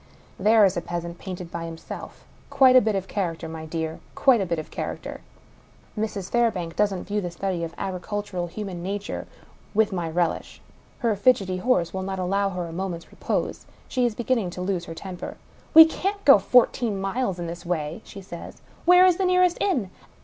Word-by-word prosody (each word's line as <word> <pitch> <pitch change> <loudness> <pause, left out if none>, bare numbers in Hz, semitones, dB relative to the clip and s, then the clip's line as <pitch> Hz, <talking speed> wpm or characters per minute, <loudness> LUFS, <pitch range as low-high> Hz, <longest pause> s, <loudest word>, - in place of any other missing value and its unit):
There 215 +2 +6
is 190 - +2
the 175 - -2
peasant, 170 0 -5
painted 180 -3 -7
by 170 -1 -4
himself! 165 -1 -9 0.2
Quite 260 -1 +6
a 255 - +9
bit 220 -2 0
of 195 -1 -2
character, 170 -5 -3
my 160 0 -7
dear! 160 0 -3 0.2
Quite 255 -5 +4
a 190 - -1
bit 170 0 -1
of 155 - -6
char - - -4
acter! - - -8 0.8
Mrs. 210 -4 -3
Fairbank 205 -9 0
doesn't 200 -3 +1
view 210 0 -2
the 175 - -3
study 175 0 -3
of 165 0 -5
agricultural 190 -1 -3
human 185 -1 -6
nature 200 +3 -4 0.5
with 220 -1 +3
my 175 -3 -2
relish. 170 0 -1 0.4
Her 230 -4 +1
fidgety 200 -4 +2
horse 185 -5 +1
will 190 - -3
not 190 0 -3
allow 195 +2 0
her 180 -2 -4
a 165 - -8
moment's 175 -2 -5
repose; - - -3 0.2
she 255 - 0
is 235 -3 +1
beginning 235 -5 0
to - - -3
lose 180 -2 -2
her 165 - -8
temper. 180 +1 -7 0.2
" - - -29
We 320 0 +12
can't 395 +5 -3
go 275 -7 +9
fourteen 235 -2 +3
miles 195 0 -1
in 175 - -4
this 170 +1 -6
way," 165 +1 -3
she 195 - -10
says. 175 -2 -9
*' - - -27
Where 360 +1 +7
is 360 -2 +4
the 385 - +1
nearest 365 -1 +3
inn 255 - 0
195 Hz, 200 wpm, -25 LUFS, 175-220 Hz, 0.8 s, We